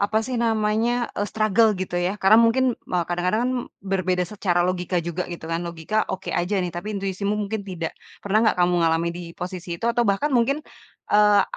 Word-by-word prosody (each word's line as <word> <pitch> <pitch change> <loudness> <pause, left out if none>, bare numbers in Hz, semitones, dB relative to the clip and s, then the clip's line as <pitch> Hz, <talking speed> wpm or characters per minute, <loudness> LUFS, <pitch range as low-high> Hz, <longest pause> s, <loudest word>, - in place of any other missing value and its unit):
apa 215 +2 +1
sih 255 -1 -2
namanya, 225 +2 +1
eee, 205 +1 -1
struggle 215 0 +3
gitu 185 - -4
ya 180 +3 -1
karena 210 +1 +5
mungkin 245 +3 +3 0.2
me 180 - -1
kadang-kadang 180 +5 0
kan 255 - 0 0.3
berbeda 185 -2 0
secara 185 -4 +1
logika 180 0 -2
juga 175 +1 -3
gitu 170 - -8
kan, 165 - 0
logika 170 +5 -4 0.2
oke 190 0 -4
aja 175 +4 0
nih, 175 - -4
tapi 175 +5 -5
intuisimu 195 +1 -2
mungkin 210 +1 -2
tidak. 170 -3 -4 0.3
Pernah 205 +1 +2
nggak - - 0
kamu 180 0 +3
ngalami 165 +1 +2
di 175 - -6 0.2
posisi 180 -1 -5
itu - - -6
atau 235 0 +2
bahkan 200 +10 +1
mungkin, 245 +4 +2 0.6
eee, 210 -1 +6
195 Hz, 190 wpm, -23 LUFS, 180-215 Hz, 0.6 s, eee